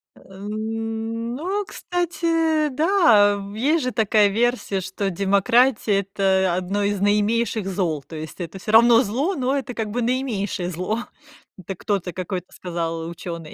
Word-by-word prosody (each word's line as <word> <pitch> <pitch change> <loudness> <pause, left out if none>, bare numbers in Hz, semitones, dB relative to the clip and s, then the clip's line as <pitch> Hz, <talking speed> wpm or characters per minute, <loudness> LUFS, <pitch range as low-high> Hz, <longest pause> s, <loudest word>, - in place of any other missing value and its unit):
Э, 190 0 -16
ну, 225 - -3
кстати, 330 -4 0
да, 285 - +4 0.2
э, - - -8
есть 300 +6 +2
же 255 - -1
такая 215 -2 +3
версия, 220 -2 0
что 195 +2 -3
демократия- 200 +4 +2
это 190 -2 +1
1 190 +3 -1
из 200 0 0
наименьших 210 +1 +1
зол, 170 -7 -1
то 160 - -11
есть 155 +2 -8
это 180 +2 -6
всё 210 - -4
равно 230 +1 +7
зло, 270 - -1
но 265 0 0
это 260 -2 -4
как 225 -2 -3
бы 240 +4 -2
наименьшее 230 -7 -1
зло. 185 +6 -2 0.6
Это 190 +1 -7
кто-то, 190 -2 -2
какой-то 185 0 -5
сказал 165 -2 -4
учёный. 170 -2 -7
210 Hz, 145 wpm, -22 LUFS, 190-245 Hz, 0.6 s, равно